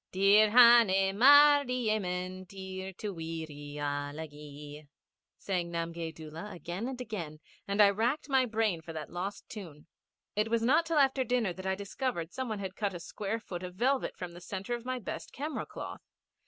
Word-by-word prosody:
Dir 200 +3 +5
hané 225 -5 +7
mard 285 +3 +7
i - - 0
yemen 185 -6 -2
dir 190 0 -7
To 205 +2 -5
weeree 160 -3 -6
ala 145 +2 -3
gee, 145 0 -11 0.5
sang 180 -3 -2
Namgay 165 -1 -3
Doola 160 +6 -8
again 175 +6 -5
and 260 -1 -5
again, 175 -11 -6 0.3
and 200 +1 -2
I 205 -1 +8
racked 235 +10 0
my 265 -3 +3
brain 215 -6 0
for 165 +1 -9
that 155 -1 -6
lost 190 +3 -5
tune. 170 -9 -10 0.5
It 210 +2 +1
was 230 0 +1
not 310 +7 +3
till 325 -1 0
after 270 -2 +4
dinner 240 -6 0
that 190 +1 -7
I 190 - +1
discovered 200 - -4
some 260 -1 -3
one 215 - -2
had 190 -2 -5
cut 200 -4 -2
a - - -5
square 205 +5 -4
foot 175 -5 -7
of 180 -1 -7
velvet 260 +6 0
from 180 -2 -6
the 175 +1 -12
centre 195 +5 -5
of 240 0 -5
my 255 0 -2
best 240 - -6
camera 300 +3 -4
cloth. - - -7
195 Hz, 185 wpm, -31 LUFS, 170-235 Hz, 0.5 s, I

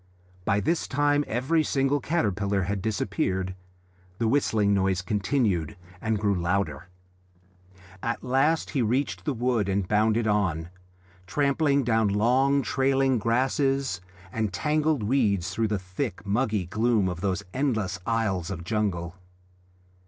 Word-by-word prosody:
By 100 - +2
this 165 +6 0
time 145 +1 +2
every 130 +8 +1
single 140 0 +1
caterpillar 100 - 0
had 100 +2 -2
disappeared. 95 -3 -1 0.6
The 115 - 0
whistling 110 -5 +2
noise 95 -2 +1
continued 100 - 0 0.2
and 110 -1 0
grew 100 -1 +1
louder. 90 -1 -1 1.1
At 115 0 -3
last 135 +6 +1
he 135 - 0
reached 125 +5 -1
the 150 - 0
wood 120 -4 0
and 95 -1 0
bounded 110 +2 +2
on, 95 -6 0 0.6
trampling 140 - +2
down 110 -2 +2
long 130 +7 +2
trailing 135 0 +2
grasses 130 -1 +1 0.3
and 110 -3 -1
tangled 150 - 0
weeds 100 -7 +1
through 110 +4 0
the 105 -1 0
thick, 90 0 -5
muggy 105 -2 0
gloom 110 +2 +1
of 90 -2 -4
those 100 0 -1
endless 110 -9 -1
aisles 100 -6 -1
of 85 -3 -5
jungle. 90 -3 -2
110 Hz, 130 wpm, -26 LUFS, 95-135 Hz, 1.1 s, By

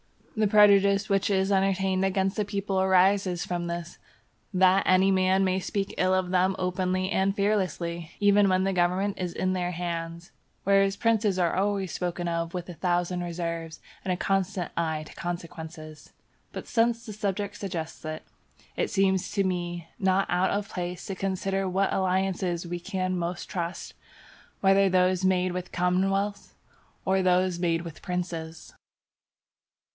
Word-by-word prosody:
The 215 -1 +2
prejudice 200 -1 +5
which 195 0 +2
is 190 0 +1
entertained 190 -1 +1
against 190 0 +1
the 210 - 0
people 200 -1 -1
arises 190 -1 +3
from 175 -1 -3
this, 170 0 -5 0.5
that 190 0 +4
any 185 +1 +5
man 190 0 +3
may 185 0 +1
speak 195 +1 -3
ill 185 +1 +3
of 185 -1 -1
them 185 +1 +2
openly 185 +1 -1
and 190 +2 +1
fearlessly, 175 -5 -1
even 205 -1 +4
when 185 0 +2
the 195 0 0
government 185 +3 +1
is 180 -2 -3
in 185 0 0
their 180 -1 -1
hands; 170 -1 -5 0.3
whereas 195 0 +3
princes 215 -3 +1
are 175 -2 +1
always 195 -2 0
spoken 175 -1 -3
of 170 0 -2
with 175 -1 -4
a - - -5
thousand 175 +1 -1
reserves 170 -2 -4 0.2
and 185 - -1
a 180 - 0
constant 195 -1 -1
eye 160 -2 -1
to - - -13
consequences. 160 -3 -7 0.4
But - - -7
since 235 0 +1
the 215 - -7
subject 205 -1 -3
suggests 170 -5 -5
it, 155 0 -5 0.5
it - - -1
seems 190 -2 +1
to 200 -2 +2
me 175 -2 -3
not 190 0 +2
out 180 +2 +2
of 200 0 -2
place 180 -1 -5
to 195 - -3
consider 195 0 -2
what 190 +2 +1
alliances 185 -2 0
we 175 0 -4
can 185 0 -2
most 175 0 -3
trust, 175 -1 -4 0.7
whether 195 0 +4
those 185 0 +2
made 185 -1 +2
with 180 0 -5
commonwealths 195 +3 0 0.5
or 190 0 +2
those 180 -1 +2
made 165 -2 +1
with 165 -2 -9
princes. 170 -3 -5
185 Hz, 155 wpm, -27 LUFS, 175-195 Hz, 0.7 s, prejudice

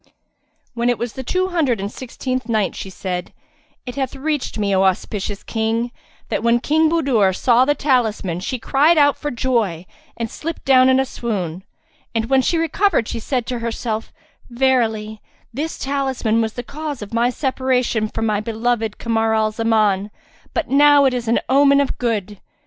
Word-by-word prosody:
When 240 0 0
it 245 - +1
was 240 -1 -4
the 265 - -6
Two 370 +7 0
Hundred 295 - +1
and 200 +1 -4
Sixteenth 255 0 -4
Night, 215 -4 0
She 195 - -6
said, 180 -1 -5 0.5
It 250 +1 -7
hath 265 -1 -2
reached 295 -1 -2
me, 205 -2 0
O 190 - +3
auspicious 195 +2 -1
King, 225 +1 -1 0.4
that - - -1
when 235 +1 +3
King 310 +5 +2
Budur 250 - +2
saw 245 +3 +4
the 290 +1 +2
talisman 225 - 0
she 255 +8 -3
cried 290 +7 +3
out 285 -1 +5
for 295 - -4
joy 230 - -1 0.3
and 230 - -2
slipped 325 +8 -6
down 260 -1 +6
in 260 0 +4
a 265 - +2
swoon; 190 -9 -4 0.5
and 225 +2 -1
when 265 -1 +5
she 335 - +1
recovered 330 - +1
she 230 - -4
said 245 +1 -2
to 245 -1 -3
herself, 230 -1 -3 0.4
"Verily, 230 -4 0 0.3
this 305 +6 -3
talisman 265 -5 0
was 220 0 -2
the 245 - -5
cause 290 -2 -6
of 205 - -11
my 235 +1 +2
separation 255 -4 0
from 225 - -3
my 210 -2 +1
beloved 225 0 -1
Kamar 225 -1 0
al 215 0 +1
Zaman; 215 -3 +1 0.5
but 335 - 0
now 285 +1 +6
it 265 - +3
is 245 -2 -3
an 230 - +3
omen 280 +1 +5
of 280 -2 -1
good." 210 -4 -2
240 Hz, 175 wpm, -20 LUFS, 220-270 Hz, 0.5 s, down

